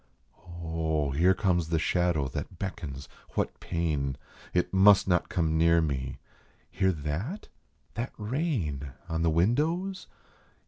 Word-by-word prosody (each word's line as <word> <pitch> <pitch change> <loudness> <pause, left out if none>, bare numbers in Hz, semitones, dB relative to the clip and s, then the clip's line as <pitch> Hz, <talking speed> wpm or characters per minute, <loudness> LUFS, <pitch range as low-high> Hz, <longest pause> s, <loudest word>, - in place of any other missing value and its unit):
Oh, 80 -3 0
here 90 +7 +4
comes 90 -3 +1
the 80 - +2
shadow 85 -3 +1
that 90 - -6
beckons 80 -7 -5 0.3
what - - -1
pain? 75 -6 -1 0.3
It 90 +1 0
must 95 +1 +6
not 90 -2 +2
come 80 -2 +1
near 85 0 +5
me! 70 -5 -2 0.5
Hear 95 0 +2
that? 85 - -4 0.4
That 115 +5 -3
rain 105 - -2 0.2
On 80 0 -1
the 85 - +3
windows? 155 - +1
85 Hz, 125 wpm, -29 LUFS, 75-95 Hz, 0.5 s, must